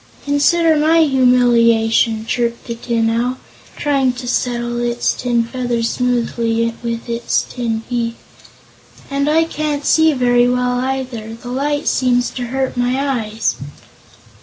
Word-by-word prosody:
"Consider 315 Hz, +3 st, +3 dB
my 320 Hz, +2 st, +4 dB
humiliation!" 235 Hz, -4 st, +3 dB
chirped 235 Hz, 0 st, -2 dB
the 235 Hz, -, -4 dB
Tin 230 Hz, -1 st, -1 dB
Owl, 240 Hz, +3 st, 0 dB, 0.4 s
trying 275 Hz, -3 st, +1 dB
to 245 Hz, 0 st, -8 dB
settle 240 Hz, -1 st, -1 dB
its 240 Hz, 0 st, 0 dB
tin 240 Hz, -2 st, 0 dB
feathers 235 Hz, -1 st, -2 dB
smoothly 230 Hz, -2 st, 0 dB
with 230 Hz, 0 st, -4 dB
its 235 Hz, 0 st, 0 dB
tin 225 Hz, -3 st, -3 dB
beak. 235 Hz, -2 st, -2 dB, 1.0 s
"And 280 Hz, +1 st, 0 dB
I 320 Hz, +2 st, +4 dB
can't 300 Hz, -3 st, -3 dB
see 320 Hz, 0 st, +4 dB
very 245 Hz, -2 st, +3 dB
well, 250 Hz, 0 st, 0 dB
either. 255 Hz, -4 st, -4 dB
The 245 Hz, +1 st, -10 dB
light 290 Hz, +3 st, -1 dB
seems 245 Hz, -1 st, +1 dB
to 245 Hz, -2 st, -5 dB
hurt 265 Hz, +1 st, -2 dB
my 245 Hz, +2 st, 0 dB, 0.3 s
eyes." 220 Hz, +1 st, -2 dB
245 Hz, 135 wpm, -17 LUFS, 235-265 Hz, 1.0 s, my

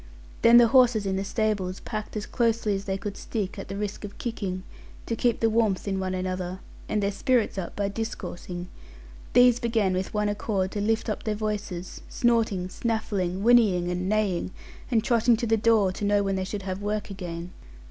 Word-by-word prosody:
Then 235 Hz, +1 st, +8 dB
the 240 Hz, -1 st, +7 dB
horses 245 Hz, -4 st, +5 dB
in 190 Hz, -1 st, 0 dB
the 195 Hz, -, -1 dB
stables, 200 Hz, -3 st, -1 dB
packed 215 Hz, -1 st, -5 dB
as 210 Hz, -, -3 dB
closely 230 Hz, -3 st, +1 dB
as 195 Hz, 0 st, -3 dB
they 190 Hz, -1 st, -1 dB
could 200 Hz, +1 st, -5 dB
stick, 205 Hz, -4 st, -4 dB
at -, -, -7 dB
the 195 Hz, -, -5 dB
risk 210 Hz, 0 st, -4 dB
of 205 Hz, -1 st, -8 dB
kicking, 195 Hz, -6 st, -4 dB, 0.4 s
to 230 Hz, -, -2 dB
keep 235 Hz, 0 st, +1 dB
the 225 Hz, -, +4 dB
warmth 220 Hz, -4 st, +1 dB
in 195 Hz, -1 st, -1 dB
one 185 Hz, 0 st, -2 dB
another, 185 Hz, 0 st, -3 dB, 0.3 s
and 210 Hz, -1 st, 0 dB
their 200 Hz, -, +1 dB
spirits 240 Hz, +2 st, +1 dB
up 175 Hz, -, -6 dB
by 200 Hz, -1 st, 0 dB
discoursing; 180 Hz, -4 st, -5 dB, 0.6 s
these 245 Hz, -1 st, +6 dB
began 225 Hz, -5 st, +1 dB
with 185 Hz, +1 st, -2 dB
one 210 Hz, 0 st, 0 dB
accord 200 Hz, -2 st, -1 dB
to 205 Hz, -, -3 dB
lift 220 Hz, +3 st, 0 dB
up 215 Hz, -, -2 dB
their 215 Hz, -1 st, -2 dB
voices, 205 Hz, -4 st, -4 dB
snorting, 225 Hz, -6 st, +1 dB
snaffling, 200 Hz, -3 st, -2 dB
whinnying, 210 Hz, -7 st, +4 dB
and 180 Hz, +1 st, -2 dB
neighing, 205 Hz, -5 st, 0 dB, 0.4 s
and 230 Hz, -4 st, +2 dB
trotting 235 Hz, -2 st, +3 dB
to 240 Hz, -, -2 dB
the 225 Hz, 0 st, +3 dB
door 215 Hz, -3 st, +3 dB
to 185 Hz, -, -7 dB
know 205 Hz, 0 st, +3 dB
when 195 Hz, -1 st, 0 dB
they 190 Hz, 0 st, -1 dB
should 200 Hz, +1 st, -5 dB
have 190 Hz, +1 st, -4 dB
work 210 Hz, 0 st, -2 dB
again. 175 Hz, -2 st, -6 dB
205 Hz, 200 wpm, -26 LUFS, 190-225 Hz, 0.6 s, Then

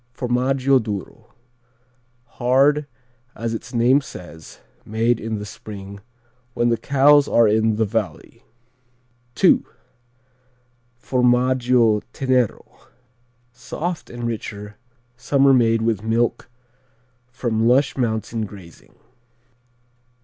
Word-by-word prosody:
Formaggio 130 Hz, +2 st, +1 dB
Duro: 105 Hz, -4 st, -7 dB, 0.9 s
hard, 135 Hz, +5 st, +1 dB, 0.5 s
as 115 Hz, 0 st, -4 dB
its 115 Hz, -, -7 dB
name 125 Hz, +4 st, +3 dB
says, 85 Hz, -, -12 dB, 0.2 s
made 115 Hz, +2 st, 0 dB
in 110 Hz, 0 st, -4 dB
the 105 Hz, -, -6 dB
spring 100 Hz, -1 st, -10 dB, 0.6 s
when 120 Hz, 0 st, +1 dB
the 115 Hz, -, +1 dB
cows 140 Hz, +4 st, +4 dB
are 115 Hz, -1 st, +4 dB
in 110 Hz, +1 st, +2 dB
the 110 Hz, +1 st, +1 dB
valley. 105 Hz, -6 st, -5 dB, 1.0 s
II. -, -, +5 dB, 1.4 s
Formaggio 125 Hz, -3 st, +2 dB
Tenero: 130 Hz, -4 st, -1 dB, 0.7 s
soft 160 Hz, +8 st, -5 dB
and 120 Hz, 0 st, -8 dB
richer, 105 Hz, -2 st, -6 dB, 0.4 s
summer 135 Hz, +2 st, +3 dB
made 115 Hz, -3 st, +3 dB
with 110 Hz, -3 st, 0 dB
milk 115 Hz, +3 st, -1 dB, 0.8 s
from 115 Hz, -3 st, -1 dB
lush 130 Hz, +3 st, +3 dB
mountain 110 Hz, -2 st, -2 dB
grazing. 95 Hz, -5 st, -15 dB
120 Hz, 95 wpm, -21 LUFS, 110-130 Hz, 1.4 s, II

